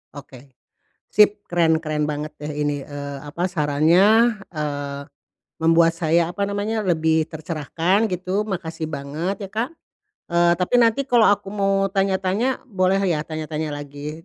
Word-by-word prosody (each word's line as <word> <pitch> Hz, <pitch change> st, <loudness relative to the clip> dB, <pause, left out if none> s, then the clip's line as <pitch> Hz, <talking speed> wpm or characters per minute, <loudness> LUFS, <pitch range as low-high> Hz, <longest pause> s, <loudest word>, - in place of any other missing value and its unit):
Oke. 140 Hz, -2 st, -12 dB, 0.6 s
Sip! 210 Hz, 0 st, +4 dB
Keren-keren 160 Hz, -3 st, +1 dB
banget 150 Hz, 0 st, -4 dB
deh 150 Hz, +1 st, -5 dB
ini, 145 Hz, -1 st, -2 dB
eee, 140 Hz, -1 st, -6 dB
apa, 160 Hz, +6 st, -3 dB
sarannya, 180 Hz, +9 st, +4 dB
eee, 145 Hz, -3 st, -4 dB, 0.6 s
membuat 165 Hz, 0 st, +4 dB
saya, 165 Hz, 0 st, +2 dB
apa 200 Hz, -, -2 dB
namanya, 205 Hz, +2 st, -2 dB
lebih 160 Hz, -3 st, +2 dB
tercerahkan, 165 Hz, +6 st, -1 dB
gitu. 185 Hz, +3 st, -1 dB
Makasih 165 Hz, -6 st, -5 dB
banget 160 Hz, +8 st, -4 dB
ya, -, -, -23 dB
Kak. 230 Hz, +4 st, -1 dB, 0.6 s
Eee, 170 Hz, 0 st, +3 dB
tapi 180 Hz, +6 st, -1 dB
nanti 230 Hz, +4 st, +2 dB
kalau 240 Hz, -4 st, +5 dB
aku 205 Hz, -1 st, 0 dB
mau 195 Hz, -1 st, +1 dB
tanya-tanya 195 Hz, +5 st, 0 dB
boleh 190 Hz, -4 st, +1 dB
ya, 160 Hz, -4 st, 0 dB
tanya-tanya 155 Hz, 0 st, -4 dB
lagi 145 Hz, +2 st, -7 dB
170 Hz, 135 wpm, -22 LUFS, 150-195 Hz, 0.6 s, kalau